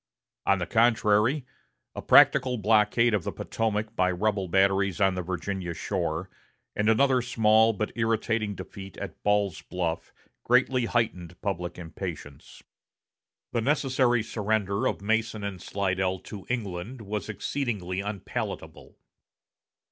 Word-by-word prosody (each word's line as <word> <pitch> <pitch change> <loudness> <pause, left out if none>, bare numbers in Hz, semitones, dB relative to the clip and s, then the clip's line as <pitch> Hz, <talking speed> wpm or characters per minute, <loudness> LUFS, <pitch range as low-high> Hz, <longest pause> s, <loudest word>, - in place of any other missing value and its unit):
On 100 - +4
the 90 - -2
contrary, 115 - +3 0.5
a - - -6
practical 130 -2 +5
blockade 110 +2 +3
of 100 -5 +1
the - - -3
Potomac 110 0 -2
by 95 -3 +2
rebel 100 +1 0
batteries 95 0 +2
on 95 -1 +3
the 90 - -2
Virginia 90 0 -4
shore, 85 -2 -2 0.5
and 105 +1 +1
another 130 +3 +4
small 110 -2 +4
but 110 0 -3
irritating 110 -2 0
defeat 95 +1 -9
at - - -7
Ball's 105 -4 +1
Bluff, 85 -2 -3 0.3
greatly 125 0 +3
heightened 90 -8 -2
public 90 -3 -3
impatience. 80 -4 -8 0.9
The 115 - 0
necessary 130 -3 +2
surrender 110 +1 -1
of - - -3
Mason 110 0 0
and 100 -3 -5
Slidell 95 -1 -1
to 100 -3 -10
England 110 0 -4
was 105 +1 -4
exceedingly 105 -4 -3
unpalatable. 100 -1 -6
105 Hz, 125 wpm, -27 LUFS, 95-115 Hz, 0.9 s, practical